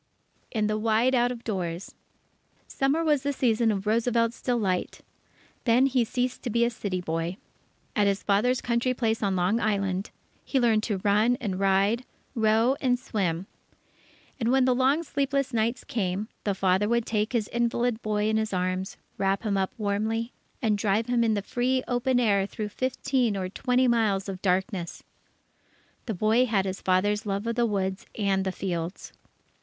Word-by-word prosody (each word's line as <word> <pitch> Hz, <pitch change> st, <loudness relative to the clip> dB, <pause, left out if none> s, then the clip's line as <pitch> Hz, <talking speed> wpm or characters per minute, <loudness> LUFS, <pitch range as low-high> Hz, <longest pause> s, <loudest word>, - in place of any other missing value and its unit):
In 215 Hz, -3 st, 0 dB
the 215 Hz, 0 st, 0 dB
Wide 225 Hz, +4 st, +2 dB
Out 245 Hz, -1 st, +3 dB
of 240 Hz, -1 st, -7 dB
Doors 180 Hz, -4 st, -4 dB, 0.7 s
Summer 275 Hz, +5 st, 0 dB
was 300 Hz, -4 st, +2 dB
the 285 Hz, +1 st, -1 dB
season 235 Hz, -4 st, +2 dB
of 195 Hz, -1 st, -3 dB
Roosevelt's 230 Hz, +1 st, +1 dB
delight. 210 Hz, -8 st, -1 dB, 0.6 s
Then 245 Hz, +2 st, +5 dB
he 260 Hz, -2 st, +2 dB
ceased 250 Hz, +2 st, -2 dB
to 245 Hz, -, -4 dB
be 235 Hz, +1 st, +2 dB
a 235 Hz, -, 0 dB
city 200 Hz, -5 st, -3 dB
boy. 165 Hz, +1 st, -3 dB, 0.6 s
At 205 Hz, -3 st, +3 dB
his 200 Hz, 0 st, 0 dB
father's 225 Hz, +5 st, +2 dB
country 245 Hz, +1 st, 0 dB
place 225 Hz, -2 st, 0 dB
on 195 Hz, -3 st, +1 dB
Long 185 Hz, +5 st, +1 dB
Island, 195 Hz, -3 st, -1 dB, 0.3 s
he 270 Hz, -, 0 dB
learned 230 Hz, -3 st, +3 dB
to 210 Hz, -4 st, -1 dB
run 210 Hz, +4 st, +3 dB
and 195 Hz, -5 st, -3 dB
ride, 195 Hz, +5 st, +2 dB, 0.3 s
row, 225 Hz, +3 st, +3 dB
and 250 Hz, -2 st, +2 dB
swim. 190 Hz, -8 st, -2 dB, 0.9 s
And 230 Hz, -2 st, 0 dB
when 260 Hz, 0 st, +4 dB
the 255 Hz, -, +4 dB
long 265 Hz, +6 st, +2 dB
sleepless 275 Hz, -3 st, -1 dB
nights 230 Hz, +2 st, 0 dB
came, 200 Hz, -1 st, -2 dB, 0.2 s
the 200 Hz, -2 st, 0 dB
father 190 Hz, +2 st, +2 dB
would 235 Hz, -1 st, +1 dB
take 215 Hz, +1 st, -1 dB
his 225 Hz, -4 st, 0 dB
invalid 235 Hz, 0 st, 0 dB
boy 210 Hz, 0 st, 0 dB
in 220 Hz, 0 st, +2 dB
his 220 Hz, -2 st, -1 dB
arms, 185 Hz, +1 st, -2 dB, 0.2 s
wrap 195 Hz, +1 st, +1 dB
him 210 Hz, -3 st, 0 dB
up 190 Hz, -1 st, 0 dB
warmly, 220 Hz, +3 st, -1 dB, 0.3 s
and 210 Hz, -3 st, +2 dB
drive 210 Hz, +2 st, +1 dB
with 245 Hz, -, -2 dB
him 235 Hz, -1 st, +3 dB
in 220 Hz, -2 st, +2 dB
the 200 Hz, -, -2 dB
free 255 Hz, +3 st, 0 dB
open 245 Hz, +1 st, +1 dB
air 200 Hz, -5 st, +2 dB
through 210 Hz, 0 st, -5 dB
fifteen 255 Hz, -1 st, 0 dB
or 185 Hz, -1 st, -3 dB
twenty 250 Hz, +5 st, +1 dB
miles 215 Hz, -5 st, +1 dB
of 190 Hz, -1 st, -6 dB
darkness. 185 Hz, -1 st, -1 dB, 1.0 s
The 220 Hz, -, -2 dB
boy 220 Hz, +6 st, +3 dB
had 200 Hz, -4 st, +1 dB
his 190 Hz, 0 st, -4 dB
father's 205 Hz, +4 st, +1 dB
love 200 Hz, +2 st, -2 dB
of 230 Hz, -, 0 dB
the 240 Hz, 0 st, +2 dB
woods 190 Hz, -2 st, -2 dB
and 195 Hz, -3 st, +1 dB
the 190 Hz, -, 0 dB
fields. 175 Hz, -2 st, -4 dB
220 Hz, 175 wpm, -27 LUFS, 195-245 Hz, 1.0 s, Then